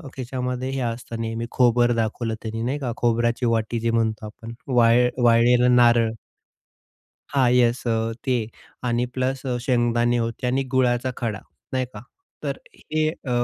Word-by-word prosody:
खिशामध्ये 125 0 -3
हे 135 - -3
असतं 115 -1 -4
नेहमी." 115 +1 -3
खोबर 120 -1 +3
दाखवलं 115 0 -1
त्यांनी, 115 0 -4
नाही 130 +5 -2
का? 130 -4 -3
खोबऱ्याची 120 +1 +1
वाटी 115 0 0
जे 115 +1 0
म्हणतो 110 -1 0
आपण. 115 +2 -9
वाळ 120 -1 +4 0.2
वाळलेलं 120 +1 +5
नारळ. 120 -2 +5 1.2
हां, 130 -3 +3
येस 120 -1 +3
अ, 115 0 0
ते 125 -4 +1 0.4
आणि 120 0 0
प्लस 130 +1 -1 0.2
शेंगदाणे 120 -1 +1
होते 115 +2 -3
आणि 130 +2 +1
गुळाचा 130 0 +2
खडा, 110 -4 -3 0.3
नाही 130 -1 0
का? 105 - -7 0.4
तर - - -2 0.2
हे 155 0 -1
अ, 135 -5 -8
120 Hz, 145 wpm, -23 LUFS, 115-125 Hz, 1.2 s, वाळलेलं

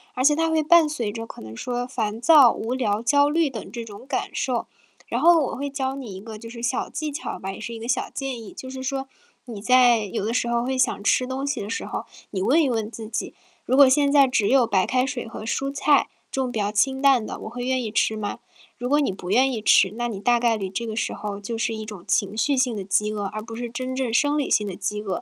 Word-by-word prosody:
而 255 - -2
且 295 +1 +6
它 325 +1 +1
会 320 -1 +2
伴 325 0 +5
随 235 -9 -3
着 225 +1 -5
可 - - -11
能 110 0 -9
说 245 - -3
烦 220 -3 -3
躁、 275 -2 +7
无 230 +3 -3
聊、 220 -5 0
焦 285 +4 +3
虑 320 0 +2
等 230 -5 -8
这 235 -1 -6
种 210 +2 -11
感 270 -1 -3
受。 250 -3 -1 0.4
然 - - -2
后 340 0 +6
我 - - -4
会 285 +2 -4
教 270 -1 -2
你 255 -7 -7
一 190 - -8
个 215 +2 -9
就 230 +1 -10
是 235 0 -9
小 240 +2 -1
技 310 0 -4
巧 295 +3 -5
吧， 195 +1 -5
也 - - -10
是 235 - -5
一 225 - -7
个 230 - -7
小 255 - 0
建 265 -4 -4
议， 210 - -10
就 260 - -9
是 260 0 -7
说 270 0 -3 0.4
你 225 -5 -8
在 245 0 +5
有 200 0 -3
的 225 - -1
时 240 -1 0
候 235 0 0
会 260 +1 -1
想 255 -5 +1
吃 255 - +3
东 265 +2 -4
西 280 - -2
的 200 - -6
时 - - -3
候。 - - -4 0.3
你 190 - -3
问 265 - +4
一 290 - +2
问 225 -2 -2
自 225 -2 -8
己： 225 - -4 0.3
“如 260 - +1
果 280 -1 +9
现 280 +2 +3
在 280 -2 +6
只 225 -5 +1
有 260 -2 +4
白 190 -3 +2
开 255 0 +1
水 265 -2 -4
和 225 -1 -8
蔬 275 +4 -2
菜， 285 0 +3 0.2
这 270 - -1
种 255 -1 -2
比 225 - -3
较 205 0 0
清 265 +6 +1
淡 270 -5 +4
的， - - -6
我 - - -7
会 245 +2 -6
愿 260 0 0
意 225 - -3
吃 220 0 +1
吗？” 205 -1 -4 0.4
如 245 - -4
果 290 +3 +3
你 280 - +1
不 185 -1 -8
愿 255 +6 +4
意 230 -4 -3
吃， - - +5
那 240 0 -1
你 205 -4 -5
大 240 +2 +3
概 235 -1 +2
率 205 -3 -3
你 - - -4
这 230 +4 -3
个 220 - -4
时 230 - -1
候 200 0 -5
就 225 +3 -4
是 225 0 -1
一 220 - -5
种 210 -5 -9
情 215 -1 0
绪 285 +5 +2
性 255 -4 +1
的 200 - -4
饥 210 +2 +1
饿， 205 -1 -3
而 215 +2 -4
不 225 +1 -10
是 240 +1 -5
真 255 +2 -4
正 260 -3 -2
生 290 +4 +2
理 290 - -1
性 210 - +2
的 195 - -4
饥 210 +3 -3
饿。 200 -3 -3
240 Hz, 305 characters per minute, -24 LUFS, 215-270 Hz, 0.4 s, 果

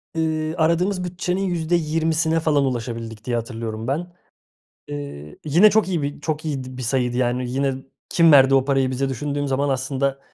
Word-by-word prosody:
Iıı, 160 0 -1
"aradığımız 180 +4 +1
bütçenin 180 +1 -2
%20'sine 165 -2 +1
falan 150 -3 +2
ulaşabildik" 115 -3 -4
diye, 120 - -1
hatırlıyorum 115 -1 -4
ben. 170 +6 -2 0.8
Iıı, 70 +1 -7
yine 170 +8 +6
çok 215 -1 +2
iyi 175 -5 -1
bir 145 +1 -4
çok 155 +1 -3
iyiydi 130 -4 -4
bir 130 - -5
sayıydı, 125 0 0
yani, 125 0 0
"yine 135 +1 0 0.3
kim 165 -2 +5
verdi 135 -1 +7
o 135 -1 +4
parayı 135 -2 +1
bize?" 135 +1 -1
düşündüğüm 145 +2 -2
zaman 135 +2 0
aslında 135 +1 -1
140 Hz, 160 wpm, -22 LUFS, 125-160 Hz, 0.8 s, verdi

